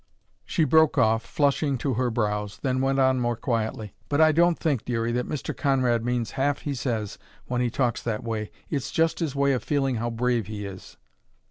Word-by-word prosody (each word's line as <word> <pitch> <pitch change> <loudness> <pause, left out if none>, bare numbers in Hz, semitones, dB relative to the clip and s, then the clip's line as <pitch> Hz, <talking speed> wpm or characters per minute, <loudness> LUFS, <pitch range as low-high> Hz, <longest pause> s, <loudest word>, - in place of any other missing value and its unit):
She 165 - +1
broke 160 0 +4
off, 110 +1 +3
flushing 140 +2 +1
to 130 +2 -1
her 125 +2 0
brows, 105 -3 -2
then 130 -1 +1
went 135 0 +1
on 130 -1 +3
more 120 -1 0
quietly: 110 -3 -2 0.2
"But 145 - +1
I 160 0 +6
don't 170 +2 +3
think, 140 -8 0
Dearie, 115 -1 -1
that 125 +1 -2
Mr. 150 - -4
Conrad 130 -5 +1
means 120 -3 -1
half 140 +1 0
he 145 - -3
says 115 -5 -3 0.3
when 125 0 -1
he 125 - +1
talks 120 0 0
that 115 0 -3
way; 110 -2 -3 0.2
it's 140 -5 -3
just 165 0 +1
his 155 -5 -2
way 140 0 +3
of 125 -4 -2
feeling 135 0 0
how 120 +2 -2
brave 120 -2 0
he 105 -1 -5
is." 95 -2 -10
125 Hz, 205 wpm, -25 LUFS, 115-140 Hz, 0.3 s, I